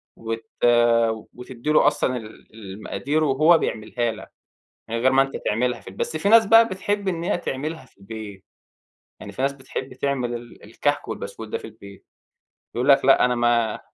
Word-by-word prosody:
وت 115 0 -5 0.9
وتدّي 125 +2 -7
له 150 - +5
أصلًا 145 -3 +1
ال 110 -1 -12
المقادير 110 +9 -3
وهو 155 +4 +5
بيعملها 115 -2 -2
لك 105 -3 -11 0.6
من 115 - -2
غير 125 +3 +2
ما 135 0 +5
أنت 135 0 -2
تعملها 120 +2 0
في - - -20
البي 95 - -11
بس 155 - -2
في 180 +6 0
ناس 225 +1 +7
بقى 225 +2 +6
بتحب 200 +1 -3
إن 170 -3 -2
هي 175 - 0
تعملها 155 0 -5
في - - -29
البيت. 100 -1 -9 0.8
يعني - - -9
في 130 - -5
ناس 140 - +1
بتحب 130 -1 -7
تعمل 130 -2 -2
ال 120 0 -10
الكَحك 145 +7 -2
والبسكوت 110 0 -7
ده - - -3
في - - -16
البيت. 100 -3 -14 0.7
بيقولوا 125 +4 +4
لك - - -5
لأ، 135 -2 +6
أنا 125 0 +1
ما 120 -2 +1
125 Hz, 180 wpm, -23 LUFS, 110-145 Hz, 0.9 s, ناس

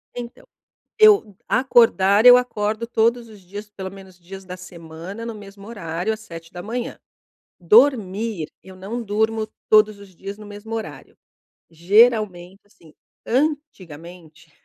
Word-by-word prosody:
Então, 240 0 -9 0.5
eu 400 - +5
acordar, 225 -4 +3
eu 250 0 +10
acordo 220 -2 -2
todos 230 +1 +1
os 210 -3 -15
dias, 205 +3 -10
pelo 190 -2 -8
menos 190 -2 -14
dias 190 +2 -11
da 180 0 -7
semana, 180 +4 -10
no 230 -2 -6
mesmo 200 0 -13
horário, 180 -1 -3
às 215 - -8
7h 165 -5 -11
da 175 - -8
manhã. 235 +3 -5 0.6
Dormir, 210 - +2
eu 190 -1 -14
não 210 +6 -6
durmo 220 +1 -1 0.2
todos 215 -1 +4
os 195 -2 -15
dias 195 +3 -8
no 215 - -12
mesmo 205 +2 -8
horário. 225 - -8 0.5
Geralmente, 195 +1 +2
assim, 165 -6 -21 0.3
antigamente, 175 - -4
205 Hz, 135 wpm, -21 LUFS, 185-225 Hz, 0.6 s, eu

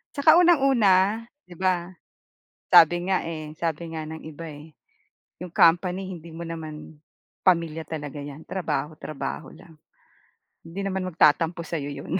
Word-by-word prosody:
Tsaka 315 +4 +6
unang-una, 230 - +4 0.2
'di 175 -1 -15
ba, 180 -1 0 0.8
sabi 175 +3 +6
nga 190 - +1
eh, 155 -2 -6
sabi 165 0 -3
nga 160 -1 -5
ng 160 0 -8
iba 160 +1 -9
eh. 150 +1 -11 0.7
'Yong 180 - -8
company 180 +3 +3
hindi 170 -3 -9
mo 165 +1 -7
naman, 155 -2 -8 0.4
pamilya 165 -3 +2
talaga 145 -2 -6
'yan, 145 +2 -10
trabaho, 155 -4 -3
trabaho 140 -3 -6
lang. 165 - -16 0.8
Hindi 175 +4 -7
naman 190 -1 -2
mag-tatampo 165 +1 +2
sa'yo 155 -3 -4 0.2
'yon. 185 - -2
165 Hz, 140 wpm, -25 LUFS, 155-185 Hz, 0.8 s, Tsaka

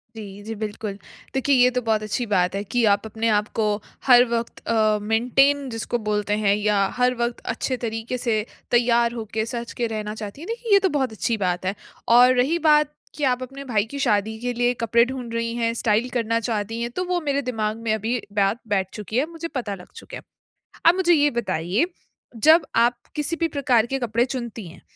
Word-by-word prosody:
जी, 205 -2 -9
जी, 225 +1 -5
बिल्कुल। 210 -1 -5 0.4
देखिए 265 +1 +2
ये 250 0 +6
तो 250 0 -1
बहुत 220 -2 0
अच्छी 215 +3 -2
बात 180 0 +2
है 200 - -2
कि 245 -1 +2
आप 205 +2 -2
अपने 220 +1 -2
आपको 215 +1 0 0.4
हर 245 -1 +8
वक़्त 235 -1 -3
अ, 215 -2 +2
मेंटेन 260 +6 +2
जिसको 225 +1 -2
बोलते 210 0 0
हैं 200 0 +4
या 210 -1 +2
हर 250 0 +3
वक़्त 235 0 -2 0.2
अच्छे 255 0 -2
तरीके 225 +1 -4
से 220 -4 0 0.3
तैयार 235 -1 +3
होके, 220 -1 -3
सज 235 0 -5
के 235 -1 -1
रहना 215 -1 -4
चाहती 215 +6 -8
हैं। 345 - -8
देखिए 465 0 -4
ये 400 - +8
तो 380 - +1
बहुत 260 -4 0
अच्छी 220 +1 -1
बात 180 0 -1
है 190 +2 -1 0.4
और 250 +1 +7
रही 280 +8 +2
बात 300 -1 +4 0.2
कि 295 - -5
आप 255 -1 +2
अपने 270 +2 -8
भाई 220 -6 +1
की 280 - -5
शादी 215 -2 +1
के 245 +1 -2
लिए 245 +1 +1
कपड़े 235 +1 +4
ढूँढ 250 -2 -6
रही 230 0 -2
हैं, 230 -1 0
स्टाइल 225 +1 +1
करना 230 -2 0
चाहती 225 0 -3
हैं 235 - -2
तो - - +1
वो 360 0 0
मेरे 285 -2 0
दिमाग 220 -4 -2
में 220 -1 +1
अभी 225 +3 -1
बात 200 +2 +1
बैठ 190 -1 0
चुकी 215 +2 -5
है, 275 - +3
मुझे 335 0 -5
पता 240 -9 -4
लग 180 - -15
चुका - - -9
है। - - -12 0.6
अब 335 - +7
मुझे 360 -2 +3
ये 295 -2 +4
बताइए 205 - 0 0.6
जब 320 +2 +7
आप 240 +1 +3 0.2
किसी 300 +2 -1
भी 330 - +2
प्रकार 255 -5 +2
के 270 - 0
कपड़े 235 0 +1
चुनती 235 -6 -6
हैं, 165 - -13
235 Hz, 210 wpm, -23 LUFS, 215-255 Hz, 0.6 s, हर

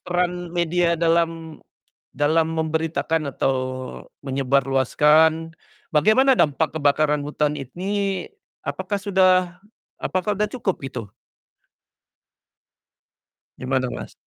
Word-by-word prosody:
peran 175 0 -2
media 170 0 +1
dalam 165 -1 0 0.5
dalam 160 +2 +1
memberitakan 160 -1 -1
atau 135 0 0 0.7
menyebarluaskan 140 +4 +2 0.4
bagaimana 255 - +5
dampak 155 - +1
kebakaran 150 0 +2
hutan 150 0 -1
ini 190 +7 -3 0.3
apakah 205 -1 -3
sudah 185 -3 +2 0.5
apakah 185 +3 -1
udah 210 +1 -1
cukup 225 -7 -1
gitu? 130 -4 -5 2.6
Gimana 130 0 -1
Mas? - - -7
165 Hz, 85 wpm, -22 LUFS, 145-180 Hz, 2.6 s, bagaimana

